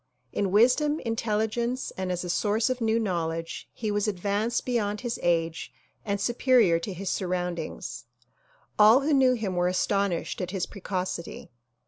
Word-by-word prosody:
In 200 -2 0
wisdom, 255 +9 +3
intelligence 230 +2 -1
and 185 -1 -3
as 180 0 -2
a 180 - -5
source 215 +6 +1
of 255 -1 -3
new 225 0 +2
knowledge 165 -6 -3
he 215 -2 -3
was 205 +1 0
advanced 205 +4 -1
beyond 210 -4 -1
his 240 -2 -3
age 165 -1 0 0.3
and 200 -1 -2
superior 235 -5 +3
to 195 - -5
his 190 +1 -4
surroundings. 180 -2 -3 0.7
All 220 +5 +7
who 295 +2 +1
knew 260 -2 +5
him 215 -6 -2
were 175 0 +2
astonished 190 0 0
at 180 - -3
his 190 -1 -2
precocity. 185 -6 -5
205 Hz, 150 wpm, -27 LUFS, 180-230 Hz, 0.7 s, All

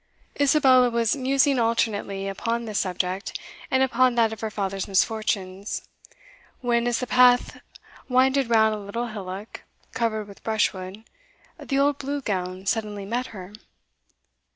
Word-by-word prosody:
Isabella 265 -3 +5
was 235 0 +1
musing 275 0 +2
alternately 210 -4 0
upon 230 +4 -2
this 215 -2 -2
subject, 185 +1 -2 0.3
and 260 0 +3
upon 255 -1 +3
that 225 -2 +3
of 220 - -10
her 220 - -2
father's 195 -2 -3
misfortunes, 200 -1 -1 0.8
when, 240 -1 +1
as 240 - +1
the 250 - -2
path 250 0 +4 0.5
winded 260 0 +3
round 220 -1 +4
a 215 - -4
little 230 +4 -4
hillock 200 0 -7 0.3
covered 220 -3 -1
with 200 - -14
brushwood, 205 -2 -1 0.6
the 275 - -2
old 280 0 +2
Blue 285 +1 -3
Gown 185 -5 -3
suddenly 210 -1 -2
met 240 +5 -2
her. 190 -2 -10
225 Hz, 135 wpm, -24 LUFS, 200-250 Hz, 0.8 s, Isabella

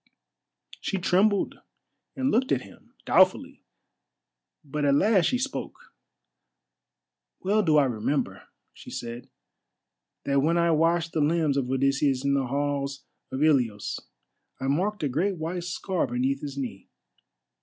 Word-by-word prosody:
She 195 - -2
trembled 195 +3 +2 0.6
and 265 0 0
looked 260 +4 +1
at - - +1
him - - -18
doubtfully, - - +3 1.0
but 150 +1 -3
at 140 -1 +4
last 195 +2 +4
she 250 - +2
spoke: 265 +2 -5 1.5
"Well 205 +3 +2
do 160 -6 +3
I 145 - +5
remember," 115 -4 -2 0.3
she - - -12
said, 120 +1 -7 0.9
"that 140 0 +2
when 165 +4 +2
I 170 0 +3
washed 165 +1 +2
the 155 - 0
limbs 155 -1 +2
of 135 -3 -1
Odysseus, 135 0 +1
in 140 - +2
the 135 -2 +1
halls 140 0 -2 0.3
of 130 +3 -1
Ilios, 125 -9 +1 0.6
I - - -4
marked 185 +8 0
a - - +2
great 175 +9 0
white 170 +2 -4
scar 180 +1 -2
beneath 130 +3 -1
his 140 -2 -6
knee. 120 -8 -6
145 Hz, 135 wpm, -26 LUFS, 135-175 Hz, 1.5 s, I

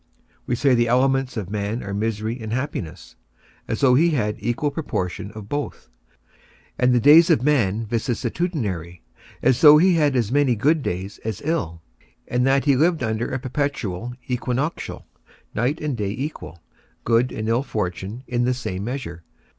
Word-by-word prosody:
We 120 - +1
say 135 +2 +3
the 120 -1 +3
elements 130 +1 +1
of 100 -3 -4
man 105 +3 -2
are 100 - -5
misery 110 +3 -2
and 110 -1 -5
happiness, 105 - -5 0.5
as - - -3
though 130 -3 +5
he 160 +7 +4
had 110 -9 0
an - - -18
equal 120 +6 0
proportion 100 - -3
of 110 -2 -9
both, 145 +4 -5 0.9
and 125 0 +4
the 125 - +4
days 150 +6 +7
of 120 - +3
man 115 -7 +1
vicissitudinary, 110 - -2 0.4
as 125 - +3
though 150 -1 +9
he 180 +4 +5
had 150 -5 +2
as 115 -3 0
many 140 -3 +3
good 150 +8 +2
days 95 -3 -4
as 110 -3 -4
ill, 85 - -2 0.4
and 125 +1 +1
that 135 +1 +2
he 140 -2 +4
lived 160 +1 +2
under 110 +1 -1
a 130 - -1
perpetual 125 -5 -3
equinoctial, 125 +5 -3 0.5
night 125 +8 0
and 150 -5 -3
day 105 -3 -2
equal, 110 - -6 0.4
good 120 +2 +2
and 110 - -4
ill 115 +2 +2
fortune 105 0 -4
in 120 0 0
the 125 +1 +1
same 95 -6 -4
measure. 115 -8 -5
120 Hz, 170 wpm, -22 LUFS, 105-140 Hz, 0.9 s, though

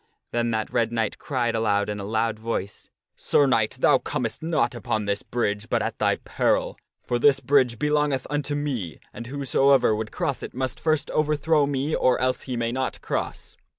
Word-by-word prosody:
Then 120 0 0
that 110 -1 -2
Red 115 -1 +1
Knight 115 -2 -1
cried 120 -5 -1
out 105 -2 +1
in 105 -1 -4
a - - -5
loud 110 +1 -1
voice, 110 -3 -4
' - - -66
Sir 145 - +2
Knight, 115 -2 +1
thou 140 -3 +5
comest 115 -2 -3
not 160 -4 +1
upon 110 -2 -2
this 100 0 -1
bridge 105 -3 -2
but - - +1
at - - -4
thy - - +3
peril; - - 0 0.3
for 120 - -1
this 135 +1 +5
bridge 130 -5 +2
belongeth 150 -2 +1
unto 145 0 -2
me, 130 - -3
and 120 - -8
whosoever 135 -2 +3
would 110 0 -4
cross 160 -7 -2
it - - -7
must 130 0 -2
first 155 -2 0
overthrow 155 0 +2
me 140 +2 -1
or 130 - +3
else 130 0 0
he 125 - -2
may 115 0 -1
not 130 +1 -2
cross.' - - -4
125 Hz, 190 wpm, -25 LUFS, 110-145 Hz, 0.3 s, thou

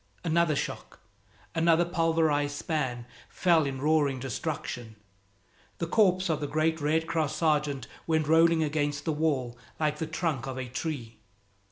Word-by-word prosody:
Another 170 -2 +2
shock - - -5 0.5
another 165 +1 +3
pulverized 160 -4 +1
span 130 -8 -2 0.2
fell 165 -5 +3
in 135 -1 -4
roaring 145 -2 +2
destruction. 125 -3 -4 0.8
The 170 - -2
corpse 185 0 +3
of 160 -3 0
the 145 - -2
great 160 +2 0
Red 160 +2 +1
Cross 160 -4 -1
sergeant 150 -5 +1 0.2
went 160 -2 +1
rolling 165 +1 +5
against 145 -1 -1
the 160 - 0
wall 135 -6 -1 0.2
like 150 -1 0
the 160 - -2
trunk 155 -5 -2
of 130 -1 -5
a 130 -1 -4
tree. 120 -4 -5
155 Hz, 145 wpm, -28 LUFS, 140-165 Hz, 0.8 s, rolling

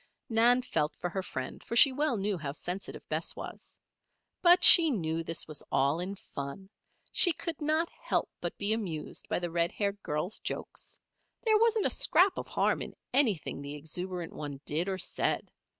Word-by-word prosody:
Nan 240 +2 +4
felt 155 -9 -1
for 175 - -4
her 190 - -2
friend, 130 -8 -6
for 235 - -5
she 270 +3 +7
well 280 -2 0
knew 200 +1 -1
how 140 -3 -5
sensitive 180 +5 -6
Bess - - -3
was. - - -9 0.6
But 355 0 +6
she 330 -2 +10
knew 165 - -2
this 165 0 -2
was 155 -2 -8
all 140 +4 +2
in 190 +3 -3
fun. 165 +4 -8 0.4
She 355 - +6
could 335 +1 -5
not 310 +3 +1
help - - -2
but - - -4
be 205 +1 +2
amused 175 -9 -5
by - - 0
the 175 -1 -4
red 170 0 0
haired 200 -1 -2
girl's 155 +7 -3
jokes. - - -7 0.5
There 435 -2 +3
wasn't 450 -2 +2
a - - +2
scrap 375 +1 +4
of - - -6
harm - - 0
in - - -7 0.2
anything 220 - +2
the 140 +1 -7
exuberant 175 +3 -5
one 145 -2 -7
did 165 +6 -1
or 190 - -2
said. 185 - -2
190 Hz, 180 wpm, -30 LUFS, 160-255 Hz, 0.6 s, she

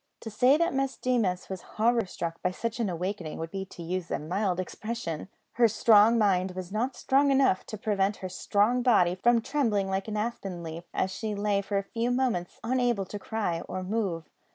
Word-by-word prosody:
To 225 - -7
say 250 +7 +4
that 335 +2 +1
Miss 270 0 -1
Deemas 220 -8 0
was 190 -2 -6 0.2
horror 230 -1 +3
struck 165 -2 -5
by 180 - +1
such 230 +5 -4
an 225 -4 0
awakening 180 -1 -4
would 165 0 -5
be 195 -1 -4
to 180 -2 -10
use 175 +1 -3
a - - 0
mild 185 +4 -1
expression. 185 -4 -4 0.2
Her 235 -1 +4
strong 220 +1 +5
mind 190 -4 +2
was 185 -1 -6
not 245 +5 -1
strong 275 +3 +3
enough 270 -8 +3
to 215 - -6
prevent 200 -1 0
her 185 - -5
strong 210 +6 +1
body 205 -8 +4
from 235 +5 +3
trembling 220 -10 0
like 190 +1 -1
an 215 -1 -3
aspen 195 -5 -3
leaf, 165 +1 -7
as 190 - -1
she 215 +1 -3
lay 205 0 +1
for 200 0 -2
a 195 - 0
few 230 +4 -2
moments 245 -9 -1
unable 240 -4 +1
to 205 +2 -7
cry 200 -7 -2
or 185 0 -3
move. 185 -5 -2
205 Hz, 200 wpm, -28 LUFS, 185-235 Hz, 0.2 s, strong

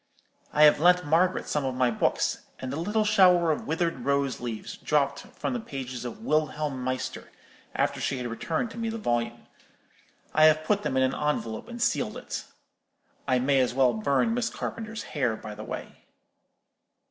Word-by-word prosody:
I 150 - +4
have 150 -1 +7
lent 180 +1 +5
Margaret 165 +5 +2
some 150 - 0
of 130 -1 -2
my 125 -1 +2
books; 110 - 0
and 130 0 -5
a - - -2
little 210 +7 0
shower 180 -5 +5
of 155 - -3
withered 165 -2 0
rose 140 0 0
leaves 115 -3 -5
dropped 140 -2 +1
from - - -5
the 245 - -1
pages 130 - -6
of 165 - -7
'Wilhelm 150 - 0
Meister,' 130 0 -4 0.4
after - - 0
she 135 - -1
had 125 - -4
returned 160 - -3
me 230 -1 -2
the 225 - -4
volume. 120 - -2 0.9
I 155 - +6
have 155 0 +5
put 205 +5 +1
them 130 - -1
in 130 - +4
an 130 - +1
envelope, 130 -7 -2
and 240 0 -8
sealed - - 0
it. - - -6 0.8
I 130 -1 +3
may 135 +2 +3
as 125 -1 +1
well 130 -2 +4
burn 140 - +1
Miss 235 -1 0
Carpenter's 225 -1 -5
hair, 130 -7 -1
by 110 -1 -8
the 105 +1 -8
way. - - -8
145 Hz, 180 wpm, -27 LUFS, 130-180 Hz, 0.9 s, have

